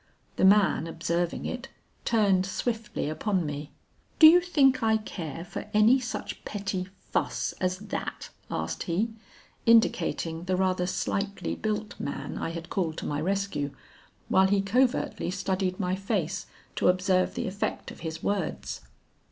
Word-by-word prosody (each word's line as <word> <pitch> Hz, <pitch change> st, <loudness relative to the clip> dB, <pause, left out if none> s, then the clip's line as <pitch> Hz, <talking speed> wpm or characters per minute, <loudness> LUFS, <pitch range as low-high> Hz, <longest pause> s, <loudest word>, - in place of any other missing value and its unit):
The -, -, +3 dB
man 195 Hz, -4 st, +5 dB
observing 170 Hz, +1 st, -1 dB
it, 255 Hz, +1 st, -4 dB, 0.4 s
turned 200 Hz, -5 st, +3 dB
swiftly 225 Hz, -2 st, -2 dB
upon 180 Hz, +3 st, 0 dB
me. 145 Hz, 0 st, -5 dB, 0.5 s
'Do 315 Hz, -, +9 dB
you 340 Hz, +3 st, +9 dB
think 280 Hz, -7 st, +3 dB
I 220 Hz, -1 st, +3 dB
care 170 Hz, -7 st, -6 dB
for 180 Hz, -, -6 dB
any 220 Hz, +5 st, +6 dB
such 235 Hz, -3 st, -5 dB
petty 195 Hz, -3 st, -3 dB, 0.2 s
fuss -, -, 0 dB
as 185 Hz, 0 st, +1 dB
that?' 210 Hz, +2 st, -5 dB, 0.2 s
asked -, -, -3 dB
he, 205 Hz, +7 st, +1 dB, 0.6 s
indicating 175 Hz, -7 st, +3 dB
the 185 Hz, 0 st, +1 dB
rather 185 Hz, -1 st, +1 dB
slightly 200 Hz, +2 st, -2 dB
built 215 Hz, 0 st, -3 dB
man 140 Hz, -, -4 dB
I -, -, -2 dB
had 170 Hz, 0 st, -7 dB
called 165 Hz, -5 st, -1 dB
to -, -, -4 dB
my 145 Hz, 0 st, -1 dB
rescue, 185 Hz, -6 st, -1 dB, 0.5 s
while 190 Hz, 0 st, +5 dB
he 195 Hz, 0 st, +2 dB
covertly 250 Hz, 0 st, +1 dB
studied 185 Hz, -1 st, -1 dB
my 185 Hz, -1 st, 0 dB
face 195 Hz, -4 st, -2 dB, 0.3 s
to -, -, +2 dB
observe 185 Hz, 0 st, +2 dB
the -, -, -2 dB
effect 195 Hz, +2 st, -3 dB
of -, -, -12 dB
his 160 Hz, -1 st, -5 dB
words. 200 Hz, -4 st, -2 dB
190 Hz, 145 wpm, -28 LUFS, 175-215 Hz, 0.6 s, Do